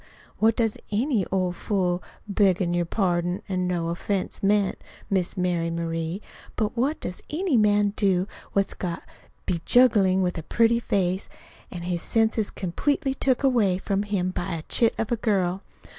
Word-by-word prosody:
What 220 0 +4
does 225 -3 0
any 220 - +1
old 185 -2 0
fool 185 -4 0 0.3
beggin' 190 -3 +2
your 175 0 +1
pardon 175 -2 0
an' 185 -2 -1
no 170 -2 -1
offense 190 +4 -2
meant, 200 -1 +2 0.3
Miss 190 -2 0
Mary 175 -2 0
Marie 165 +2 -3 0.3
but 215 0 -1
what 270 +6 0
does 180 - -5
any 335 -1 0
man 205 -2 +3
do 190 -2 +2 0.3
what's 195 -1 +1
got 175 -2 -4 0.4
bejuggled 190 0 +3
with 180 -1 -1
a - - -5
pretty 230 +7 +2
face, 190 -5 -1 0.4
an' 175 -2 -7
his 175 -1 -2
senses 220 -1 +1
completely 270 - -1
took 265 0 +1
away 225 -9 +3
from 195 +1 -1
him 200 -3 -1
by 175 -1 -3
a 160 - -5
chit 230 +6 +2
of 225 - -2
a - - +3
girl? 195 -4 0
195 Hz, 160 wpm, -25 LUFS, 180-220 Hz, 0.4 s, What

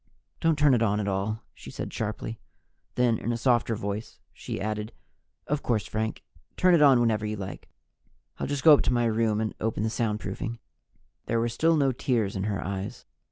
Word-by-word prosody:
"Don't 165 -2 +2
turn 150 -2 +5
it 120 - +3
on 105 -2 +2
at 105 - -2
all!" 100 +3 -2
she - - -12
said - - -6
sharply. 110 +1 -4 0.6
Then, 120 -3 +2
in 120 - -2
a 115 - -1
softer 120 -2 +2
voice, 100 +1 -5
she - - -6
added: 105 +1 -3 0.5
"Of 150 0 -1
course, 110 -4 0
Frank, 110 +1 -3 0.3
turn 180 0 +5
it 165 - +5
on 135 -4 +7
whenever 110 -3 +2
you 105 0 -2
like. 95 -3 -7 0.7
I'll - - -2
just 145 -1 -2
go 155 -3 +9
to - - +1
my 120 -1 +2
room 110 -1 +1
and 110 -1 -1
open 110 -1 -1
the 110 - +1
soundproofing." 110 0 -2 0.7
There 115 - +1
were 120 +1 +1
still 160 +8 +2
no 140 -2 +3
tears 115 -5 0
in 95 0 -2
her 100 -3 -2
eyes. 95 +1 -5
115 Hz, 195 wpm, -27 LUFS, 105-125 Hz, 0.7 s, go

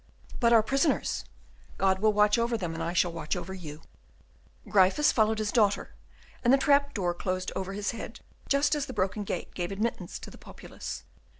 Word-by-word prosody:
"But 235 -2 +4
our 225 -2 +6
prisoners?" 275 +6 0 0.5
"God 190 -1 +2
will 215 +1 +4
watch 210 +1 +3
over 235 0 +1
them, 175 -5 -4
and 165 - -5
I 165 +1 -1
shall 175 0 +2
watch 165 -1 -3
over 180 +1 -5
you." 160 -4 -9 0.8
Gryphus 195 +9 +4
followed 220 -1 +2
his 215 -1 -1
daughter, 210 -4 +1 0.5
and 240 - +4
the 270 - +7
trap 280 0 +3
door 180 -4 0
closed 185 +1 -3
over 190 0 -3
his 205 0 -2
head, 230 -1 -8 0.3
just 285 +2 +3
as 295 -2 -1
the 260 - -6
broken 200 +3 0
gate - - -5
gave 175 0 -3
admittance 215 +4 -3
to - - -10
the - - -14
populace. - - -8
210 Hz, 190 wpm, -28 LUFS, 185-235 Hz, 0.8 s, the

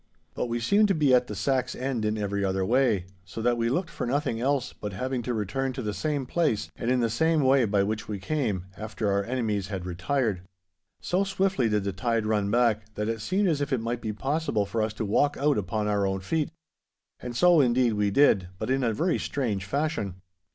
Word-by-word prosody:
But - - -2
we 120 0 -2
seemed 200 - +4
to 195 - +2
be 145 -4 +3
at 125 -1 +4
the 105 - -5
sack's 130 +7 0
end 125 -4 -2
in 105 +1 0
every 100 -1 -1
other 95 -1 0
way, 115 -5 +2 0.2
so 95 - -9
that 120 0 +3
we 115 0 0
looked 175 +8 -1
for - - -4
nothing 130 -3 -1
else 135 -1 0
but 105 -1 -6
having 130 +5 -2
to 125 - -3
return 130 +6 -2
to 130 -1 -5
the 105 -1 -2
same 140 +6 -2
place, 145 -6 0
and 120 - -3
in 125 -1 +2
the 115 - +2
same 160 +6 +2
way 135 -2 +4
by 100 -2 +2
which 105 +2 -3
we 105 - -3
came, 105 - -2
after 110 -1 -3
our 100 0 +1
enemies 110 -5 -1
had 95 -3 -5
retired. 95 +3 -1 0.6
So 185 +3 +1
swiftly 195 - +1
did 105 -2 +1
the 100 -1 -2
tide 115 +3 0
run 105 -2 +1
back, 110 -2 +1
that 105 +1 -2
it 115 -1 -3
seemed 190 - +1
as 155 -5 +1
if 145 0 -2
it 130 - +2
might 115 +1 -3
be 110 - -2
possible 135 -1 -1
for 110 +3 -2
us 110 0 -1
to 110 - -3
walk 145 +8 +2
out 145 -3 +2
upon 105 +2 -2
our 100 -1 +1
own 95 0 -2
feet. 150 +10 -1 0.7
And 125 -1 -6
so 175 +3 +6
indeed 125 -2 +3
we 105 -1 +1
did, 100 -5 +4
but 130 - -3
in 135 0 +1
a 115 -2 +1
very 165 - 0
strange 110 -9 -2
fashion. 140 - -2
115 Hz, 230 wpm, -27 LUFS, 105-135 Hz, 0.7 s, so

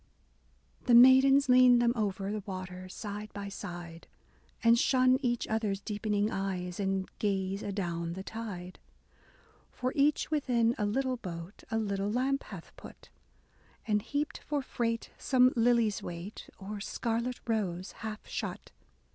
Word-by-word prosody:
The 240 - +5
Maidens 265 +3 +7
lean 250 -1 +7
them 240 0 +3
over 200 -3 -2
The 215 - -2
waters 185 -1 -6
side 210 -1 -6
by 200 0 -5
side, 175 -4 -8 0.6
And 230 0 +6
shun 255 0 +4
each 240 -3 0
other's 215 -3 -1
deepening 210 +1 -1
eyes, 185 -2 -3
And 195 -1 -1
gaze 195 -1 -1
adown 170 -4 -3
the 190 +2 -6
tide, 195 -5 -7 0.5
— - - -31
For 255 +1 -1
each 295 +2 +2
within 245 -6 +2
a 210 - +1
little 260 +4 0
boat 175 -2 -8
A 225 - 0
little 200 -2 -1
lamp 265 +4 +1
hath - - -10
put, - - -13 0.8
And 210 -1 +1
heaped 290 +6 -3
for 290 -2 -2
freight 230 -3 -2
some 255 -1 +4
lily's 230 -3 +3
weight, 175 +4 -7
Or 205 +2 -6
scarlet 235 +4 -2
rose 190 -5 -2
half 215 -1 -7
shut. - - -5
215 Hz, 140 wpm, -31 LUFS, 195-245 Hz, 0.8 s, Maidens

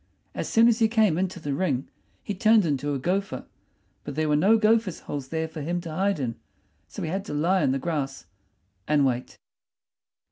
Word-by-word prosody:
As - - -4
soon 225 +1 +5
as 235 -1 +3
he 225 - +5
came 220 -6 +3
into 185 -1 -2
the 145 -3 -3
ring 135 -5 -1 0.4
he 205 - -3
turned 215 +1 +4
into 145 -1 -1
a - - 0
gopher; 190 +8 -2 0.6
but 145 - -6
there 155 0 0
were 150 - +3
no 200 +9 +5
gophers' 220 -3 +2
holes 140 -3 -5
there 160 +2 -2
for 160 -1 -8
him 175 +4 -2
to 170 -2 -7
hide 195 +2 0
in, 120 -4 -3 0.5
so - - -7
he 160 - -2
had 195 +2 -2
to 150 - -5
lie 180 +5 +2
in - - +2
the 135 - +1
grass 135 -2 -3 0.6
and 145 -2 +3
wait. 125 -1 -2
165 Hz, 205 wpm, -26 LUFS, 145-195 Hz, 0.6 s, soon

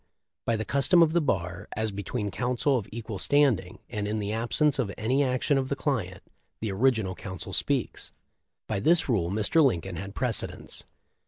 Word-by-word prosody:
By 115 - +2
the 110 0 -3
custom 165 - +4
of 160 -1 +2
the 170 - +3
bar, 95 - -2
as 110 0 0
between 100 +2 -3
counsel 125 +6 0
of 115 -6 -2
equal 110 -3 -6
standing, 120 -9 +2
and 105 -3 -3
in 105 +1 -1
the 105 -1 -2
absence 130 +6 +1
of 110 -6 0
any 130 +6 +1
action 130 +2 +1
of 130 0 -3
the 140 - 0
client, 110 - -2 0.4
the 110 -2 -2
original 110 -2 +2
counsel 95 -3 -7
speaks. - - -1 0.5
By - - -2
this 165 - +4
rule 100 -10 +1
Mr. 110 - +3
Lincoln 95 - 0
had 100 +4 -7
precedence. 125 -4 -3
110 Hz, 175 wpm, -27 LUFS, 100-135 Hz, 0.5 s, custom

